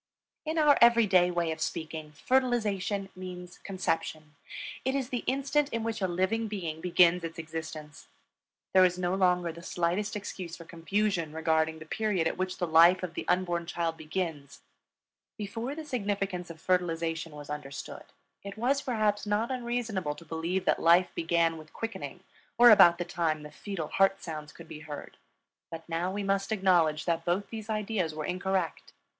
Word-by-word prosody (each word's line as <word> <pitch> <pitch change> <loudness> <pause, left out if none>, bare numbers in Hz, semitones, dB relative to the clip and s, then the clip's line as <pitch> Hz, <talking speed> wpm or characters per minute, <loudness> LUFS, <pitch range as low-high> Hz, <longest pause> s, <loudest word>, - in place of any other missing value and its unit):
In 315 +1 -2
our 300 -2 +5
every 235 -1 +7
day 180 -3 +4
way 170 -2 0
of 160 0 -5
speaking, 155 -2 -4
fertilization 210 - 0
means 180 -1 -8
conception; 160 -5 -3 0.5
it 265 +1 0
is 265 -3 -1
the 245 -3 -3
instant 280 +2 +1
in 230 -4 -2
which 225 -2 -3
a 190 - +2
living 190 +6 0
being 170 -7 -4
begins 180 0 +4
its 165 0 -6
existence. 155 -2 -7 0.7
There 185 - +7
is 180 -1 +3
no 180 0 0
longer 180 -2 +2
the 170 +1 -11
slightest 180 +5 -1
excuse 185 -4 -6
for 165 - -11
confusion 170 -1 -1
regarding 160 0 +1
the 155 - -10
period 190 -2 0
at - - -2
which 185 0 -3
the 175 - 0
life 170 +3 +6
of 175 -2 -4
the - - -5
unborn 175 -2 0
child 170 -1 -1
begins. 155 -3 -4 0.8
Before 225 +6 -4
the 320 0 -7
significance 200 -8 -2
of 165 -1 -9
fertilization 165 -3 -1
was 145 0 -9
understood, 140 -1 -7 0.4
it 200 +1 -8
was 265 +5 +1
perhaps 215 -5 0
not 210 +4 0
unreasonable 235 -10 -2
to 170 - -13
believe 165 +4 -2
that - - +2
life 170 +2 +5
began 165 0 +1
with 155 0 -14
quickening 225 0 -6 0.4
or 240 0 +9
about 175 -5 +8
the 175 - -3
time 160 -3 -1
the 150 - -9
fetal 185 -7 -5
heart 195 0 +3
sounds 155 -3 -6
could 170 - -13
be 150 - -8
heard. 150 -1 -9 0.5
But 165 0 -8
now 170 +2 -1
we 200 +1 -3
must 195 +1 0
acknowledge 175 -7 +3
that 165 -1 0
both 180 +4 -1
these 220 -1 -7
ideas 210 -7 -1
were 155 -1 -3
incorrect. 185 -1 -2
180 Hz, 175 wpm, -29 LUFS, 165-205 Hz, 0.8 s, or